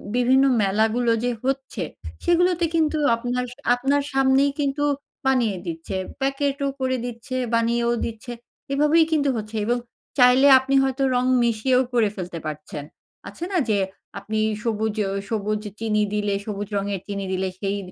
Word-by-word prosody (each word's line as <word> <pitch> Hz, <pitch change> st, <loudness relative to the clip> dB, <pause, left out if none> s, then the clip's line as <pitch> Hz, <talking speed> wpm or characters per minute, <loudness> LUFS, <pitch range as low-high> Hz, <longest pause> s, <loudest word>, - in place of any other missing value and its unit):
বিভিন্ন 260 Hz, +2 st, +4 dB, 0.2 s
মেলাগুলো 220 Hz, +4 st, +2 dB
যে, 245 Hz, -, +1 dB
হচ্ছে 270 Hz, 0 st, -2 dB, 0.4 s
সেগুলোতে 350 Hz, 0 st, +3 dB
কিন্তু 315 Hz, -1 st, +2 dB, 0.2 s
আপনার 245 Hz, +1 st, -2 dB
স -, -, -22 dB, 0.2 s
আপনার 275 Hz, +3 st, +1 dB
সামনেই 270 Hz, +1 st, +3 dB
কিন্তু 285 Hz, +1 st, 0 dB, 0.4 s
বানিয়ে 235 Hz, -7 st, +2 dB
দিচ্ছে। 165 Hz, +3 st, -5 dB, 0.3 s
প্যাকেট 275 Hz, +1 st, 0 dB
ও -, -, +1 dB
করে 260 Hz, 0 st, +1 dB
দিচ্ছে, 245 Hz, +1 st, -6 dB, 0.2 s
বানিয়েও 235 Hz, +1 st, +1 dB
দিচ্ছে। 230 Hz, +2 st, -7 dB, 0.4 s
এভাবেই 300 Hz, +3 st, +4 dB
কিন্তু 285 Hz, -2 st, +2 dB
হচ্ছে 215 Hz, +1 st, -6 dB
এবং 240 Hz, +2 st, +1 dB, 0.4 s
চাইলে 250 Hz, +3 st, +6 dB
আপনি 270 Hz, +1 st, -1 dB
হয়তো 270 Hz, 0 st, 0 dB
রং 250 Hz, +1 st, +2 dB, 0.2 s
মিশিয়েও 235 Hz, +3 st, +2 dB
করে 225 Hz, -4 st, +3 dB
ফেলতে 180 Hz, -3 st, -5 dB
পারছেন। 150 Hz, -1 st, -6 dB, 0.5 s
আছে 335 Hz, -, -9 dB
না -, -, +2 dB
যে, 200 Hz, -, +2 dB, 0.4 s
আপনি 215 Hz, 0 st, -3 dB, 0.2 s
সবুজ 220 Hz, -1 st, -1 dB
অ -, -, -3 dB, 0.2 s
সবুজ 210 Hz, -1 st, -1 dB, 0.2 s
চিনি 215 Hz, -2 st, +1 dB
দিলে 205 Hz, -1 st, 0 dB
সবুজ 205 Hz, -1 st, -4 dB
রঙের 200 Hz, -2 st, -2 dB
চিনি 200 Hz, -1 st, -4 dB
দিলে 190 Hz, 0 st, -1 dB
সেই 200 Hz, 0 st, -1 dB
240 Hz, 150 wpm, -23 LUFS, 210-270 Hz, 0.5 s, চাইলে